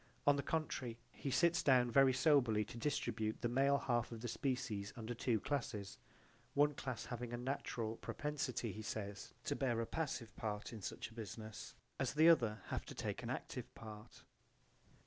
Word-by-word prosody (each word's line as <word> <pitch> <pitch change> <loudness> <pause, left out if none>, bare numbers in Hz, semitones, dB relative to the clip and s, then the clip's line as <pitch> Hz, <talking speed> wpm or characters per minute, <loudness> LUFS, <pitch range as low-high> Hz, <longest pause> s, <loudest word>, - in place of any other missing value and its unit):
On 145 - +7
the 140 - 0
contrary 140 -6 -2
he 140 - -4
sits 170 +5 +4
down 125 -3 +5
very 135 +1 +7
soberly 130 -6 +4
to 120 - -9
distribute 110 -5 -1
the 120 - +2
male 135 +3 +4
half 120 -4 0
of 115 -1 -6
the 120 - -3
species 120 -5 -1
under 115 -1 -4
two 115 -1 +1
classes: 105 -7 -3 0.6
one 145 +1 +5
class 130 -4 -4
having 120 -1 -4
a 120 - -2
natural 120 -3 -2
propensity, 140 -6 -2
he 110 - -6
says, 100 -1 -5
to - - 0
bear 120 -4 +1
a 115 - +1
passive 130 -6 -3
part 105 +1 -3
in 110 - -7
such 105 - -4
a - - -13
business, 110 -1 -7 0.2
as - - 0
the 160 +2 +8
other 115 -10 +4
have - - -1
to - - -8
take - - -2
an - - -5
active - - -4
part. 105 -1 -10
120 Hz, 180 wpm, -39 LUFS, 110-140 Hz, 0.6 s, the